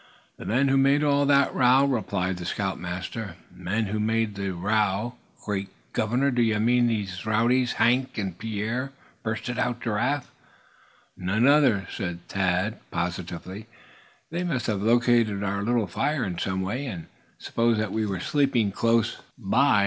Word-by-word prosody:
"The - - -8
men 130 +6 +2
who 135 0 +3
made 140 +2 +4
all 145 -1 +3
the 140 -1 +4
row," 130 +2 +5
replied 100 -8 -1
the 90 - -6
scoutmaster. 95 +1 -4 0.2
"Men 105 +5 -1
who 105 +2 -2
made 110 0 0
the 100 0 -3
row 105 +4 0 0.3
great 100 -2 -2 0.2
governor! 125 +6 +1
d'ye 115 -3 +2
mean 120 +2 +3
these 100 -5 -2
rowdies, 120 +4 +2
Hank 125 +3 +2
and 95 -5 -3
Pierre?" 115 +6 -3 0.3
burst 110 0 -3
out 120 0 -1
Giraffe. 125 +5 -1 0.8
"No 90 +2 -3
other," 135 -9 +4
said 90 -3 -5
Thad, 95 +3 0
positively. 90 +4 -4 0.6
"They 170 +2 -2
must 135 -9 -1
have 105 -4 -1
located 115 -2 +3
our 100 0 -1
little 115 +1 +1
fire 135 - -1
in 90 -4 -3
some 95 0 -1
way, 125 +9 -3
and 90 -9 -6 0.3
supposed 115 -1 +1
that 110 -2 -1
we 110 0 -1
were 95 -2 -3
sleeping 125 -3 +1
close 115 +2 +1 0.2
by. 120 +2 +3
110 Hz, 150 wpm, -26 LUFS, 100-125 Hz, 0.8 s, row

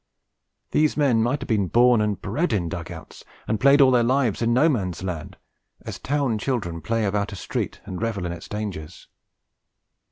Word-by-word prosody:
These 155 0 +2
men 135 -7 +3
might 125 +5 0
have 135 - -6
been 105 -5 +1
born 120 +3 +4
and 105 -2 -1
bred 165 -4 -1
in 90 -5 0
dug - - -6
outs, - - -11 0.2
and 110 -1 0
played 140 +4 +6
all 130 -1 +6
their 125 -1 +4
lives 125 -2 +1
in 115 0 +2
No 130 +7 +4
Man's 95 - -1
Land, 85 -5 -5 0.5
as - - -7
town 135 -6 -1
children 100 -11 -2
play 115 +6 -1
about 100 +1 -1
a - - -6
street - - -4
and 95 - -6
revel 110 -5 -2
in 85 - -3
its 85 -1 -8
dangers. 100 -7 -6
110 Hz, 190 wpm, -24 LUFS, 95-130 Hz, 0.5 s, played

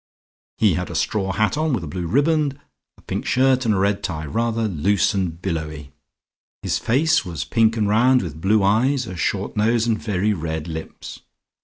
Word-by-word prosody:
He 105 -5 +3
had 90 +3 -3
a - - -6
straw 95 -3 -1
hat 110 +9 0
on, 155 -2 0
with 105 -9 -1
a - - -6
blue 85 +3 -4
riband, 145 - +1 0.4
a - - -20
pink - - -4
shirt 130 0 +2
and 110 - +3
a - - 0
red 100 +1 +1
tie, 80 -3 -4
rather 115 +6 -1
loose 100 +4 +1
and 90 -4 -2
billowy. 80 -6 -4 0.7
His - - 0
face 145 +7 +2
was 85 -3 -5
pink 115 0 +2
and 105 -2 +1
round, 125 +4 +4
with 80 -3 -7
blue 105 +2 +3
eyes, 125 +7 +2
a 95 - -7
short 85 - -2
nose 115 +2 +2
and 115 -2 0
very 105 0 0
red 80 -2 -4
lips. 80 -1 -8
105 Hz, 190 wpm, -21 LUFS, 85-115 Hz, 0.7 s, round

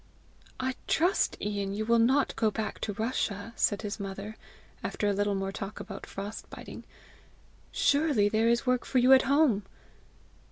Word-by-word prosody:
"I 260 0 -1
trust, 355 +5 +2
Ian, 200 -1 -2
you 215 +1 -2
will 235 +1 +4
not 260 +5 +3
go 220 - +2
back 215 0 -4
to 210 - -3
Russia!" 220 -1 -2
said 205 0 +1
his 210 +1 -4
mother, 200 +2 -6 0.5
after 210 - -2
a 205 - +2
little 205 0 0
more 195 0 -2
talk 195 +1 -6
about 195 -1 -8
frost 200 +2 -7
biting. - - -10 0.9
"Surely 285 -8 +3
there 220 +2 +2
is 235 +2 +2
work 250 -1 +2
for 265 - -1
you 250 +2 +7
at 260 - +8
home!" 280 -8 +4
215 Hz, 165 wpm, -29 LUFS, 205-250 Hz, 0.9 s, at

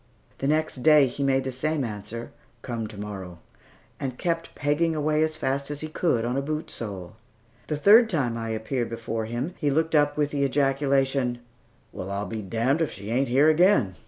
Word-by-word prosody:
The 135 - -1
next 155 0 +1
day, 150 +2 +6
he 130 +2 -5
made 135 -1 +2
the 130 - -3
same 145 +3 -1
answer, 110 +1 -6 0.3
"Come 115 -3 -4
to 105 -2 -10
morrow," 95 -4 -7 0.6
and 130 -2 -4
kept 165 -1 -2
pegging 150 +3 +1
away 155 0 +1
as 155 0 +1
fast 140 +1 -1
as 145 -1 -4
he 155 - -3
could 130 -8 0
on 120 +1 -1
a 135 - +1
boot 155 +2 -4
sole. 100 -2 -7 0.5
The 150 - -2
third 220 +8 +7
time 135 - 0
I 115 -1 -4
appeared 115 +2 -2
before 115 -1 -4
him, 120 +9 -3
he 145 - +1
looked 160 +3 +1
up 145 -1 +3
with 145 -1 +1
the 145 - -1
ejaculation, 135 -2 +1 0.6
"Well, 95 - -6
I'll 100 +1 -2
be 110 0 -5
damned, 115 - 0
if 160 - 0
she 100 +3 -7
ain't 135 +3 +1
here 135 +5 +4
again!" 155 - +3
135 Hz, 195 wpm, -25 LUFS, 115-150 Hz, 0.6 s, third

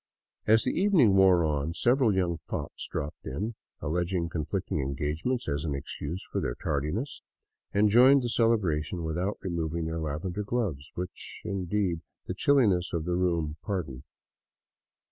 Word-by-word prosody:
As 110 +1 +5
the 130 - +1
evening 175 - +4
wore 95 -3 +6
on, 75 +1 -1
several 125 +1 +3
young 90 -4 0
fops 75 - -5
dropped 75 +1 -5
in, 100 - -3 0.3
alleging 85 +2 -1
conflicting 80 +1 -2
engagements 75 - -2
as 70 -1 -1
an 75 -4 -1
excuse 75 +5 -5
for - - -1
their - - -2
tardiness, 75 - -2 0.5
and 105 +1 +4
joined 130 +5 +6
the 120 - -1
celebration 95 -9 +1
without 90 +5 -1
removing 85 -3 -2
their 80 +1 -2
lavender 80 +6 -3
gloves, 100 - -2
which, 90 0 -7
indeed, 95 -2 -1 0.2
the - - -3
chilliness 100 -7 +3
of 80 -2 -1
the 90 - -1
room 85 -4 0
pardoned. 80 -11 -3
90 Hz, 145 wpm, -28 LUFS, 80-105 Hz, 0.5 s, wore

